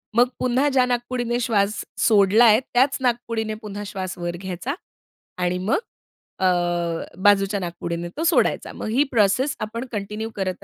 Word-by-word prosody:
मग 245 +1 +5
पुन्हा 255 +3 +2
ज्या 260 -2 +3
नाकपुडीने 240 -1 -1
श्वास 210 -3 0
सोडलाय 215 +2 +5
त्याच 270 +3 +3
नाकपुडीने 230 -3 -1
पुन्हा 205 -1 -6
श्वास 190 -2 -5
वर 175 0 -3
घ्यायचा 190 +8 -4 0.6
आणि 180 0 0
मग 190 +5 +1 0.6
अ, 190 - +1 0.8
बाजूच्या 200 0 +4
नाकपुडीने 170 -1 -4
तो 325 - -1
सोडायचा. 335 0 +2
मग - - -6
ही 250 +7 +3
प्रोसेस 235 +5 +2
आपण 230 +4 -4
कंटिन्यू 210 +1 -4
करत 185 -2 -3
215 Hz, 140 wpm, -23 LUFS, 195-245 Hz, 0.8 s, मग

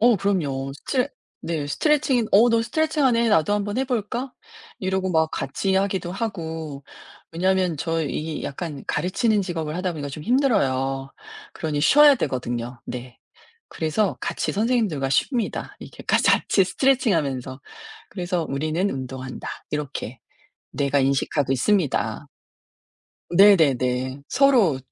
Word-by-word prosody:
어 235 -1 +5
그럼요. 145 -9 -1
스트레 255 - -1 0.4
네 160 -4 -2
스트레칭이 265 - +1
"어 230 +4 +6
너 230 0 +3
스트레칭하네 265 -4 +1
나도 160 0 +3
한번 205 0 -1
해 265 - +1
볼까?" 245 +1 -3 0.5
이러고 190 0 -1
막 160 -1 +2
같이 190 +8 -2
하기도 190 -2 0
하고. 160 -9 -5 0.5
왜냐하면 185 0 +1
저 165 +3 -1
이 155 +1 -4
약간 145 -1 -6
가르치는 210 +4 +1
직업을 165 -4 -4
하다 180 -1 -1
보니까 145 -3 -5
좀 145 +2 -7
힘들어요. 135 - +1 0.4
그러니 150 -2 -2
쉬어야 290 - +7
되거든요. 120 - -3
네. 125 0 -8 0.5
그래서 180 +6 -1
같이 - - -2
선생님들과 210 - 0
쉽니다. 235 - -1
이렇게 - - -11
가 - - +3
같이 195 - +4
스트레칭 255 +3 +2
하면서. 135 -3 -3 0.5
그래서 175 -3 -2
'우리는 155 +7 -1
운동한다.' 130 -3 -6 0.2
이렇게 140 -5 -4 0.5
뇌가 140 0 +1
인식하고 135 0 +1
있습니다. 170 - 0 1.0
네네네. 140 -8 +4
서로 245 - +4
170 Hz, 310 characters per minute, -23 LUFS, 140-210 Hz, 1.0 s, 쉬어야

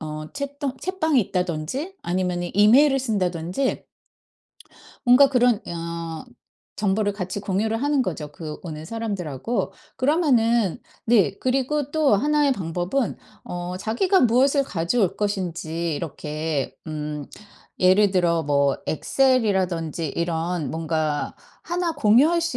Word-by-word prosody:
어 155 0 -6
챗통 280 -1 -4
챗방이 360 -5 0
있다든지 180 - -2
아니면은 175 0 -1
이메일을 260 +8 +6
쓴다든지 185 -1 -1 1.2
뭔가 255 +3 +7
그런 250 -3 +3
어 170 0 -5 0.5
정보를 205 0 +1
같이 190 0 -4
공유를 215 +4 -1
하는 285 -2 +2
거죠, 155 - -4
그 155 -1 -7
오는 155 -3 -7
사람들하고. 195 - -3 0.2
그러면은 240 - +2 0.3
네 205 -4 +3
그리고 270 +2 0
또 305 -5 +3
1 295 +7 +2
의 280 - +4
방법은 180 +5 -2 0.3
어 175 +1 -5
자기가 240 - +2
무엇을 265 +4 +4
가져올 190 0 0
것인지 170 -5 -2
이렇게 155 -2 -3
음 150 -2 -4 0.5
예를 190 +2 +5
들어 170 -3 +2
뭐 140 -2 +2
엑셀이라든지 190 - +1
이런 170 -1 -1
뭔가 155 -2 -2 0.3
1 345 -1 -1
공유할 290 +5 +4
수 335 0 -2
195 Hz, 255 characters per minute, -23 LUFS, 165-260 Hz, 1.2 s, 뭔가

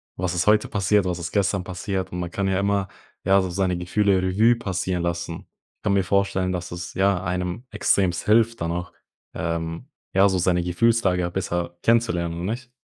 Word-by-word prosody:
was 90 0 -2
ist 90 +3 -1
heute 105 0 +4
passiert, 100 0 +2
was 90 -1 -2
ist 85 0 -5
gestern 100 -2 +1
passiert?”, 95 +1 -3
und 90 - -3
man 85 -1 -4
kann 100 -1 -1
ja 95 -1 +1
immer, 100 -1 +1 0.4
ja, 95 +1 +5
so 95 - -3
seine 90 -1 0
Gefühle 95 +2 +1
Revue 105 +6 +3
passieren 95 -5 -2
lassen. 85 -1 -3 0.3
Ich - - -60
kann 100 - +1
mir 100 -1 +3
vorstellen, 95 -1 +1
dass 90 0 -4
es, 85 0 -6
ja, 95 -1 +2
einem 90 +6 -3
extrem 95 -4 +1
hilft 115 -1 +3
dann 85 0 -1
auch, 90 +1 -4 0.4
ähm, 80 - -4 0.2
ja, 100 +1 +5
so 95 - 0
seine 90 -1 +2
Gefühlslage 90 -2 +2
besser 85 -2 -3
kennenzulernen, 90 -8 +2
oder 85 - -5
nicht? 125 +1 -6
95 Hz, 190 wpm, -24 LUFS, 85-100 Hz, 0.4 s, ja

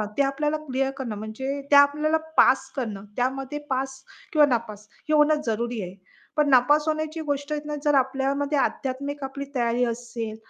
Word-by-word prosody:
अ, - - 0
ते - - +6
आपल्याला 295 +3 0
क्लिअर 270 0 0
करणं 235 -6 -4
म्हणजे 265 +7 -4
त्या 285 - +9
आपल्याला 300 +2 +3 0.2
पास 265 0 +4
करणं 215 -7 -4
त्यामध्ये 265 +3 -2
पास 265 0 -2 0.3
किंवा 300 -2 +6
नापास, 220 -5 -2 0.2
हे 310 - +2
होणं 300 0 +4
जरुरी 235 +1 -1
आहे. 180 0 -7 0.4
पण 300 -1 +3
नापास 290 +4 +5
होण्याची 310 +1 -2
गोष्ट 285 +1 -5
आहे 300 - -1
ना 300 - -3
जर 295 - +3
आपल्यामध्ये 275 +2 +1
आध्यात्मिक 280 +2 -2
आपली 275 +1 -5
तयारी 240 0 +1
असेल, 230 -2 -4
270 Hz, 170 wpm, -25 LUFS, 245-290 Hz, 0.4 s, त्या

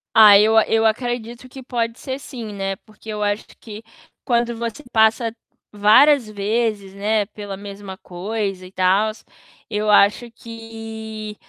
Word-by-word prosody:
Ah, 210 -2 +9
eu 220 +1 +5
eu 225 0 +2
acredito 240 +2 -2
que 265 +1 -11
pode 235 -2 -2
ser 265 -1 -5
sim, 235 -6 -8
né, 195 -1 -3
porque 215 0 -15
eu 210 -1 -3
acho 205 +1 -1
que 215 -1 -10 0.4
quando 235 -1 0
você 235 +5 -5
passa 220 +1 +2 0.4
várias 220 +5 +5
vezes, 210 -1 -2
né, 210 +1 0
pela 205 -2 -8
mesma 200 -1 -9
coisa 195 +1 -4
e 185 - -12
tals, 195 +4 +1 0.5
eu 210 0 -1
acho 210 +3 +4
que 225 -2 -8
220 Hz, 140 wpm, -21 LUFS, 205-230 Hz, 0.5 s, Ah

